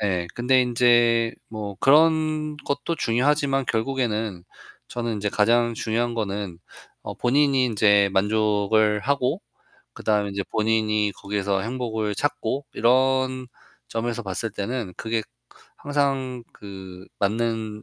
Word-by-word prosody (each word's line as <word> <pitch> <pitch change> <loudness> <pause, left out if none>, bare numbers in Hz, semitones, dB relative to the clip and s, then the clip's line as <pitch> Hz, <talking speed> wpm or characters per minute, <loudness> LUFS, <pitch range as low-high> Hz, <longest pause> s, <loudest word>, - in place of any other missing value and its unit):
네, 90 -4 0
근데 130 +2 +3
인제 120 -1 +3
뭐 105 -2 -6
그런 155 +1 +3
것도 145 +3 -3
중요하지만 135 +1 +1
결국에는 110 -6 -1 0.4
저는 120 -2 -3
인제 105 0 -2
가장 115 +3 +2
중요한 120 +2 -1
거는 100 -5 -3 0.5
어 - - -5
본인이 135 +1 +2
인제 100 -4 +3
만족을 105 +1 +2
하고 140 - 0 0.5
그다음에 105 -2 0
인제 100 0 -3
본인이 110 -1 +1
거기에서 100 -1 -2
행복을 110 -3 -3
찾고, 140 -1 -2
이런 130 +1 +2 0.4
점에서 115 0 -3
봤을 110 +4 -3
때는 105 -1 -4
그게 110 -1 -1 0.6
항상 135 -3 -1
그 95 -2 -11
맞는 110 0 -1
115 Hz, 255 characters per minute, -24 LUFS, 105-130 Hz, 0.6 s, 근데